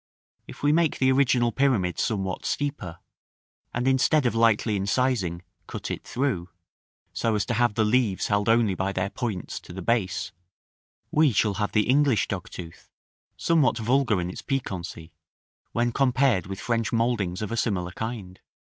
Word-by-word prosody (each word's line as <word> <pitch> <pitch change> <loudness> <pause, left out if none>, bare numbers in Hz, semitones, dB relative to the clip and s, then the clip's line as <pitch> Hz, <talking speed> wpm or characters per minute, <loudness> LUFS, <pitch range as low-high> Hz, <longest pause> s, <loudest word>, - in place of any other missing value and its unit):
If - - -12
we 145 - +4
make 160 0 +2
the 130 0 +3
original 125 -3 +3
pyramid 115 -11 +1
somewhat 95 -5 -1
steeper, 140 - -3 0.7
and 120 +2 -2
instead 135 +2 +3
of 120 - +2
lightly 115 -1 +3
incising, 100 -4 0 0.3
cut - - -5
it - - -5
through, 120 -10 -2 0.6
so 115 -2 0
as 105 - 0
to 120 - -2
have 120 -2 +2
the 110 - +2
leaves 110 -3 +1
held 105 +1 +1
only 115 -3 +3
by 95 +1 -2
their 95 +1 -2
points 105 -4 -4
to - - -13
the 95 +1 -7
base, 95 -4 0 0.8
we 155 -2 +4
shall 105 -1 +2
have 105 - -1
the 105 -1 +2
English 135 -2 +3
dogtooth; 90 -3 -7 0.5
somewhat 155 -8 +2
vulgar 120 -2 +2
in 90 0 -3
its - - -8
piquancy, 90 - -4 0.6
when 120 +1 0
compared 130 -7 +2
with 95 0 -6
French 115 -2 -1
mouldings 115 -5 0
of 105 - -4
a - - -1
similar 95 -6 -1
kind. 105 -3 -6
115 Hz, 160 wpm, -25 LUFS, 95-130 Hz, 0.8 s, we